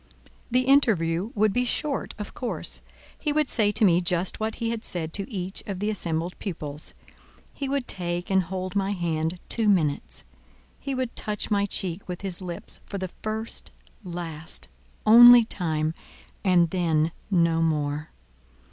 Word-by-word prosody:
The 250 +1 +3
interview 210 - +3
would 210 -1 +3
be 245 - +2
short, 275 +3 -2
of 210 -1 -7
course: 245 - -2 0.4
he 300 - -1
would 300 -1 +1
say 210 -2 +3
to 220 0 +4
me 175 -2 +4
just 175 +1 0
what 220 0 -2
he 230 -1 -2
had 230 -1 -4
said 165 -3 -1
to 200 +5 -3
each 190 -2 -4
of 200 -2 -3
the 210 +3 -1
assembled 170 -3 -2
pupils; 150 -6 -6 0.6
he 275 -2 -4
would 275 -2 -1
take 175 0 -2
and 190 0 +4
hold 185 +1 -5
my 200 0 +1
hand 165 -2 -1
two 225 -3 +1
minutes; 155 -8 0 0.6
he 275 -1 -3
would 255 -2 -3
touch 210 +1 -3
my 200 -1 +2
cheek 185 -1 -2
with 180 0 -5
his 190 -2 -4
lips 175 -2 -6
for 200 - -4
the 185 -1 -4
first, 220 +1 -3 0.3
last, 170 -3 -5 0.4
only 240 +1 +10
time—and 170 +1 -1
then—no 170 0 +1
more. 150 -1 0
190 Hz, 155 wpm, -26 LUFS, 170-220 Hz, 0.6 s, only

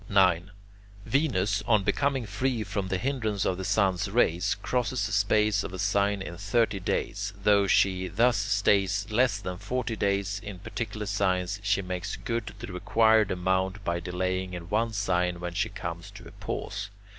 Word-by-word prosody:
9. 90 -2 +3 0.6
Venus, 105 -9 +1
on 110 -4 +4
becoming 135 +2 0
free 110 +3 -1
from 100 -1 -3
the 95 0 -1
hindrance 110 -4 -1
of 95 - +1
the - - -3
sun's 95 0 +1
rays, 90 -5 +2
crosses 125 -3 0
the 115 - -4
space 105 0 +2
of - - -6
a - - -5
sign 100 0 +1
in 85 -2 -7
thirty 105 +2 +1
days. 100 +2 -2
Though 100 -1 +4
she 95 -1 +3
thus 115 +7 +3
stays 100 -1 +2
less 115 -1 +3
than 90 -3 -6
forty 125 -1 -2
days 100 0 0
in 100 -3 -7
particular 105 +1 -5
signs, 95 0 0
she 100 -1 +1
makes 90 +1 -4
good 115 -3 -4
the 95 - -7
required 110 +3 +3
amount 95 +2 0
by 85 0 0
delaying 90 +1 -2
in 85 -1 -8
one 115 +2 +1
sign 90 -4 0
when 90 0 -4
she - - 0
comes - - -6
to - - -12
a - - -12
pause. - - -5
100 Hz, 170 wpm, -28 LUFS, 95-110 Hz, 0.6 s, on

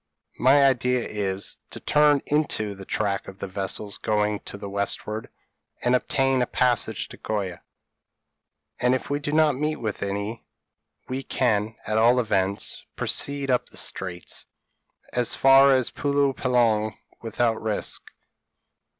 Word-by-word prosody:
p> - - -13
"My 140 +2 +6
idea 125 -2 +2
is, 100 -2 -3
to - - -10 0.2
run 145 -2 +5
into 145 -9 0
the 95 -1 -10
track 100 -1 -1
of 95 - -9
the - - -5
vessels 100 +2 -4
going 105 -1 0
to - - -6
the 100 0 -7
westward, 100 +2 -3 0.5
and 125 - +3
obtain 135 +1 +1
a 125 - +1
passage 125 -3 0
to - - -10
Goa." 100 -5 -3 1.2
"And 125 +1 +3
if 130 - -5
we 145 - +1
do 145 0 -3
not 155 -3 +3
meet 155 +1 0
with 110 -6 -4
any, 100 +3 -3 0.6
we 130 +1 -3
can, 110 -5 0
at 110 +1 +1
all 120 +3 +5
events, 100 -4 -1
proceed 140 -1 -1
up 125 - +1
the - - -11
Straits, 90 -2 -4 0.7
as 125 -1 +2
far 135 +1 +7
as 130 -2 +3
Pulo 140 -1 +1
Penang 115 -5 +1 0.2
without 115 0 0
risk. 110 -2 -1
115 Hz, 145 wpm, -25 LUFS, 105-135 Hz, 1.2 s, far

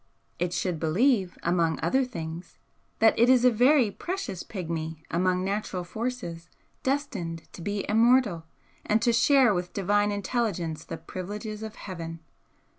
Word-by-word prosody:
It 175 0 0
should 175 -2 -1
believe, 190 - +2
among 170 -2 +1
other 265 +1 +3
things, 165 -7 -7 0.4
that 225 0 +5
It 235 +2 +5
is 255 -1 +5
a 250 - +7
very 245 0 +4
precious 360 - -4
Pigmy 160 -4 -5
among 180 +2 +1
natural 195 -2 -2
forces, 175 -4 -5 0.3
destined 180 - -2
to - - -9
be 205 +3 -2
immortal, 225 -6 +3 0.4
and 215 - +2
to 235 -1 +3
share 250 -1 +5
with 180 -1 -3
Divine 205 +1 +2
Intelligence 200 -6 -2
the 165 - -6
privileges 205 +6 -6
of 220 0 -6
Heaven. 165 -4 -7
200 Hz, 140 wpm, -27 LUFS, 170-235 Hz, 0.4 s, a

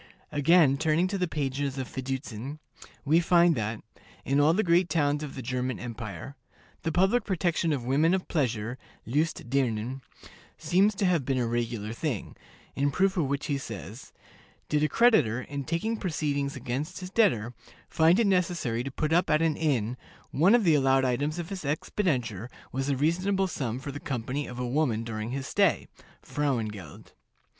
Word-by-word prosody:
Again, 145 -1 +4
turning 160 +3 +2
to 200 0 -2
the 180 - +1
pages 140 -2 -2
of 130 -2 -3
Fiducin, 130 0 -5 0.5
we 155 +4 +4
find 170 0 +4
that, 110 -4 -3 0.4
"in 140 +1 +2
all 145 +2 +5
the 215 - +2
great 175 0 +3
towns 145 -2 +1
of 150 -3 -6
the 130 - -6
German 125 +1 -2
Empire, 115 +3 -7 0.5
the 165 - -1
public 195 +8 +3
protection 170 -3 0
of 135 -5 -2
women 150 +7 +3
of 190 - -4
pleasure 120 -5 -1 0.3
(lust 150 +3 -1
dirnen) 130 -1 0 0.6
seems 195 +4 +2
to 195 - 0
have 175 -6 +2
been 135 0 -1
a 125 - +1
regular 115 -2 -2
thing," 120 - -4 0.4
in 140 +1 +1
proof 190 +6 +1
of 170 -5 +1
which 140 +1 -2
he 140 -2 -1
says, 110 - -8 0.6
"Did 150 -1 +2
a 155 - +2
creditor, 140 - +3
in 140 -1 -5
taking 170 - -1
proceedings 145 -7 -2
against 130 +5 -4
his 185 0 -7
debtor, 125 - +2 0.3
find 165 +4 +4
it 230 - +4
necessary 175 - 0
to 135 - -4
put 150 +3 -1
up 175 +2 +3
at 155 +1 +3
an 160 -2 +2
inn, 125 -7 0 0.3
one 180 - +5
of 240 - +3
the 165 -4 +4
allowed 135 -2 +3
items 145 +6 0
of 170 -1 -5
his 190 -3 -5
expenditure 130 - -1 0.2
was 135 +2 -2
a 140 - +1
reasonable 185 +7 +1
sum 130 -10 -3
for 135 +2 -6
the 145 - -7
company 135 +1 -3
of 125 - -8
a 125 - -2
woman 125 -4 0
during 110 -1 -4
his 135 +1 -4
stay 195 +2 +2 0.4
(frauen 135 -7 -1
geld)." 95 -8 -11
145 Hz, 180 wpm, -28 LUFS, 125-170 Hz, 0.6 s, all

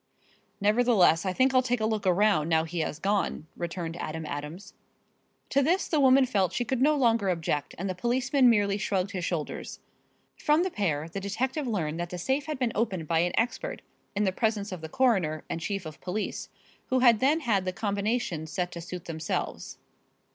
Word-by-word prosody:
"Nevertheless, 205 -5 +4
I 185 - 0
think 260 +5 +3
I'll 255 - +5
take 245 -1 0
a 220 - 0
look 215 -3 -1
around, 185 -4 +3
now 160 -1 +3
he 165 +1 -4
has 155 -2 -2
gone," 195 -2 -1
returned 170 -1 -4
Adam 160 -1 -5
Adams. 150 +6 -6 0.8
To 280 - +3
this 345 +8 +1
the 310 - +1
woman 265 -1 +6
felt 200 -7 0
she 245 - -1
could 255 +1 -1
no 300 +3 +4
longer 230 -7 +2
object 160 -5 -2
and 195 - -3
the 185 - -1
policeman 250 +6 +2
merely 205 -3 +2
shrugged 195 -2 -1
his 185 -3 -4
shoulders. 170 -4 -4 0.6
From 300 +3 +3
the 375 - -2
pair 160 - -1
the 175 +4 -5
detective 255 +9 -2
learned 170 -8 -2
that 175 0 -3
the 180 - -5
safe 265 - -1
had 305 -2 -3
been 250 -3 0
opened 190 -8 -1
by 165 0 +2
an 175 +1 +1
expert - - -1 0.3
in 205 - +1
the 190 - +2
presence 210 0 -1
of 180 -3 -6
the 160 - -7
coroner 190 -11 +1
and 165 - -3
chief 195 0 -3
of 155 -1 -9
police, 195 +3 -4 0.4
who 255 -1 +1
had 235 -4 +6
then 295 +6 +3
had 205 -8 +1
the 185 - 0
combination 200 -4 -2
set 180 +2 -3
to 170 - -7
suit 175 0 -7
themselves. 160 -1 -4
200 Hz, 200 wpm, -28 LUFS, 170-245 Hz, 0.8 s, woman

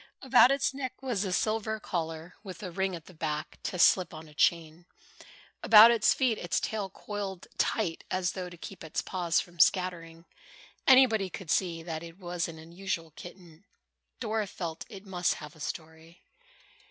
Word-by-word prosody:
About 255 -1 +6
its 275 0 +1
neck 260 -2 -5
was 235 -7 -1
a 190 - -3
silver 220 +3 0
collar 165 -2 -4
with 190 -1 -9
a 185 - -5
ring 190 +1 -1
at 165 - -10
the 185 - -14
back 155 -1 -4
to 180 - -4
slip 180 0 +4
on 155 +1 -10
a 150 - -16
chain. 165 +2 0 0.7
About 220 +2 +9
its 230 -2 +4
feet 250 -5 +1
its 175 - -1
tail 210 -3 -3
coiled 195 -2 -6
tight 185 -7 0
as 185 -1 0
though 180 -2 -6
to 175 - -12
keep 185 +1 -9
its 160 - -3
paws 175 -3 0
from 175 -1 -8
scattering. 165 -1 +1 0.6
Anybody 245 -7 +6
could 185 -2 -6
see 170 -3 0
that 160 -2 -5
it 170 0 -10
was 175 -2 -3
an 165 -1 -9
unusual 165 0 -5
kitten. 175 +1 -13 0.6
Dora 220 -2 -1
felt 170 -4 -6
sure 210 - -9
it 190 - -14
must 180 -3 0
have 150 -1 -10
a - - -17
story. 160 +2 -8
180 Hz, 180 wpm, -29 LUFS, 165-205 Hz, 0.7 s, About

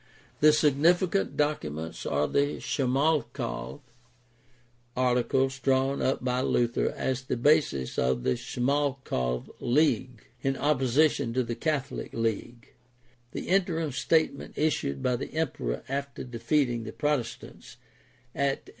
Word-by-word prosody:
The 155 0 +7
significant 165 +6 +2
documents 80 - -2
are 75 +1 +1
the 145 +1 0
Schmalkald 140 0 -1 1.2
Articles 130 +1 +1
drawn 135 +1 +1
up 130 -1 0
by 125 0 0
Luther 120 -2 +1
as 130 -1 -1
the 130 -1 -3
basis 135 - +2
of 65 -1 +1
the 65 - +2
Schmalkald 130 - -1
league 130 -3 +1 0.2
in 135 0 0
opposition 140 -2 +2
to 130 - +2
the 120 0 -3
Catholic 140 +2 -3
league, 115 +1 -3 0.6
the - - -5
Interim 175 -5 +1
statement 155 +2 0
issued 140 - 0
by 125 -1 +1
the - - -7
emperor 145 - -2
after 140 +1 -4
defeating 120 0 0
the 110 - -6
Protes 145 -6 -1
tants - - -14 0.6
at 140 0 0
M. - - -12
130 Hz, 120 wpm, -28 LUFS, 120-150 Hz, 1.2 s, The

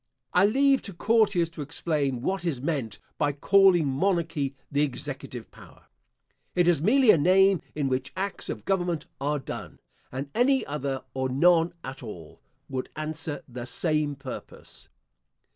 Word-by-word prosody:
I 200 - +5
leave 275 +4 +3
to 200 - -8
courtiers 200 -4 +2
to 165 - -7
explain 145 -4 -1
what 190 +2 -1
is 160 -8 -1
meant 135 -5 -2 0.2
by 145 -1 +2
calling 190 +2 +5
monarchy 150 -1 0 0.2
the 145 0 +2
executive 145 -4 -4
power. - - -16 0.7
It 175 -1 +3
is 170 -5 +3
merely 235 - +6
a 165 - +4
name 190 +3 +5
in 145 -2 0
which 130 0 -2
acts 195 +1 -3
of - - -5
government 175 -5 0 0.2
are 150 - +1
done; 135 - -7 0.3
and 135 +2 -5
any 260 +1 +3
other, 140 -2 -3
or 130 0 -1
none 165 +5 +4
at 135 +1 -7
all, 90 -10 -10 0.3
would 130 -1 -4
answer 155 -1 -4
the 120 -2 -7
same 150 +2 0
purpose. 135 -2 -10
155 Hz, 150 wpm, -27 LUFS, 135-185 Hz, 0.7 s, merely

